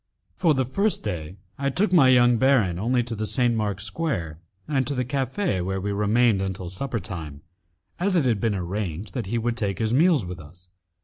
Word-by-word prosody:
For 165 -5 +2
the 130 -1 +1
first 200 - -1
day, 85 +2 -5 0.2
I 140 0 0
took 185 +8 0
my 150 -7 +7
young 120 -1 +5
baron 115 -10 +3
only 120 +4 +1
to 120 0 -6
the 110 0 -3
St. 125 -1 +1
Mark's 105 -3 -2
Square 90 - -3 0.3
and 135 -4 0
to 140 - -1
the 125 0 -1
cafe, 135 - -1
where 95 +2 -2
we 100 +2 -3
remained 105 +1 +2
until 95 -2 -4
supper 120 +5 -3
time, 80 -9 -7 0.6
as 190 +2 +1
it 160 -6 +3
had 115 -5 +2
been 110 -3 +1
arranged 95 0 -4
that 120 -7 -3
he 120 +4 -1
would 115 +1 -1
take 100 -4 -2
his 110 0 0
meals 155 - +4
with 90 0 -7
us. 90 +4 -15
115 Hz, 205 wpm, -24 LUFS, 95-130 Hz, 0.6 s, my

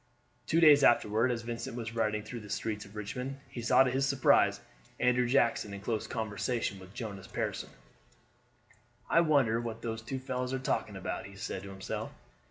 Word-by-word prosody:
Two 165 - +3
days 150 -4 +7
afterward 115 0 +4
as 120 -2 -2
Vincent 115 0 -5
was 115 -1 -5
riding 105 -2 0
through 120 +3 -7
the 105 -2 -11
streets 105 0 -3
of 100 +1 -15
Richmond 125 +6 -5
he 120 0 -7
saw 115 +3 +5
to 130 - 0
his 135 +2 +1
surprise 140 -1 +4 0.4
Andrew 125 0 +3
Jackson 115 -5 +2
in - - -7
close 110 +2 -2
conversation 110 -1 -2
with 95 +3 -14
Jonas 100 -5 -6
Pearson. - - -3 1.4
"I 170 - +6
wonder 135 -8 +3
what 115 -1 -6
those 110 -1 -3
two 125 +4 -4
fellows 130 0 -3
are - - +1
talking 110 -5 -2
about?" 95 +1 -4
he 100 - -13
said 95 0 -4
to 100 - -9
himself. 95 -1 -5
115 Hz, 180 wpm, -31 LUFS, 105-130 Hz, 1.4 s, days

